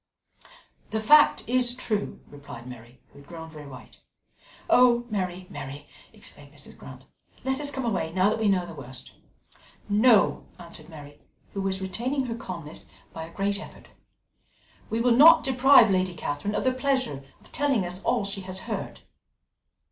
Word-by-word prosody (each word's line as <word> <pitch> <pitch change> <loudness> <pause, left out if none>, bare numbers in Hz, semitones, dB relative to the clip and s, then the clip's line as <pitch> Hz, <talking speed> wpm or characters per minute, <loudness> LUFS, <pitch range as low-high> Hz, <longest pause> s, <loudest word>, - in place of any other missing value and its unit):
"The 220 - -2
fact 295 +8 +5
is 245 0 +1
true," 215 -4 -3
replied 140 -5 -12
Mary, 125 0 -12
who - - -17
had 140 - -17
grown 160 -1 -10
very 150 -2 -11
white. 130 -2 -13 0.7
"Oh, 240 -1 +4
Mary, 185 -3 -3
Mary!" 140 +2 -8 0.3
exclaimed - - -13
Mrs. - - -13
Grant, - - -13 0.4
"let 265 +1 -1
us 290 -1 0
come 265 -3 -4
away 185 -8 -2
now 185 +3 +2
that 220 - -2
we 220 -2 +2
know 185 -3 +1
the 170 - -10
worst." 130 -4 -11 0.8
"No," 215 +1 +3
answered 170 -2 -13
Mary, 145 -3 -13 0.3
who 195 - -3
was 190 0 -1
retaining 255 +8 -2
her 230 -2 -4
calmness 170 -8 -9 0.3
by 160 0 -6
a - - -15
great 200 +1 -1
effort, - - -13 1.0
"we 225 - -2
will 245 +1 +2
not 320 +5 +8
deprive 260 -4 +5
Lady 185 -1 0
Catherine 155 +6 -4
of - - -1
the 260 - +2
pleasure 260 - -1 0.2
of - - -22
telling 275 -10 0 0.2
all 230 -3 0
she 195 0 -5
has 185 0 -5
heard." - - -6
195 Hz, 165 wpm, -26 LUFS, 160-245 Hz, 1.0 s, not